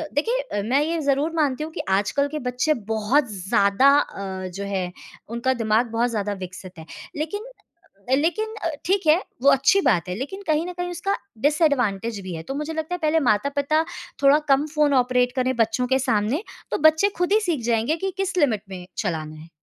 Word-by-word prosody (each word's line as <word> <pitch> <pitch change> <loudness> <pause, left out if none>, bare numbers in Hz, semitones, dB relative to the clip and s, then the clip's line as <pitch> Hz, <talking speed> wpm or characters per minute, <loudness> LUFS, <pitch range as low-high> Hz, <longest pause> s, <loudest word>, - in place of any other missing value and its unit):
देखिए 460 +13 +1 0.2
अ, - - 0
मैं 265 +6 +2
ये 330 +1 -1
ज़रूर 285 +2 +1
मानती 295 -3 +1
हूँ 320 - -9
कि - - -3
आजकल 205 +9 +1
के 305 +1 -4
बच्चे 250 +5 +1 0.2
बहुत 225 +3 +1
ज़्यादा 200 +6 +3
अ, 190 -6 -4
जो 195 +2 -6
है 190 -3 -2 0.4
उनका 235 +3 0
दिमाग 230 0 +1
बहुत 235 +2 +1
ज़्यादा 205 -2 -2
विकसित 185 -1 -11
है 160 - -10 0.3
लेकिन 410 +9 -3 0.7
लेकिन 345 +11 +1 0.3
ठीक 385 -2 +1
है, 305 - +7 0.2
वो 275 - +6
अच्छी 275 +9 +4
बात 190 -9 +2
है, - - -2
लेकिन 285 - -6
कहीं 310 +1 +1
न 360 - -5
कहीं 355 0 -4
उसका 355 +3 -1 0.3
डिसएडवांटेज 245 - +1
भी 185 -2 -6
है। 160 - -6
तो 270 - -5
मुझे 300 +2 -3
लगता 315 +3 -3
है - - -7
पहले 315 +1 +2
माता-पिता 280 +7 +1 0.4
थोड़ा 280 +2 +7
कम 275 +2 +4
फ़ोन 300 -1 +3
ऑपरेट 250 -1 +2
करें 255 0 0
बच्चों 230 +2 +1
के 265 +1 +2
सामने 230 - 0 0.3
तो - - +1
बच्चे 320 +6 +1
खुद 355 +3 +1
ही 435 - +5
सीख 340 - -1
जाएँगे 235 +6 +1
कि 385 - -1
किस 385 -1 -2
लिमिट 230 - +2
में 180 -2 -8
चलाना 155 -5 -3
है। 160 +2 -13
265 Hz, 195 wpm, -23 LUFS, 210-310 Hz, 0.7 s, है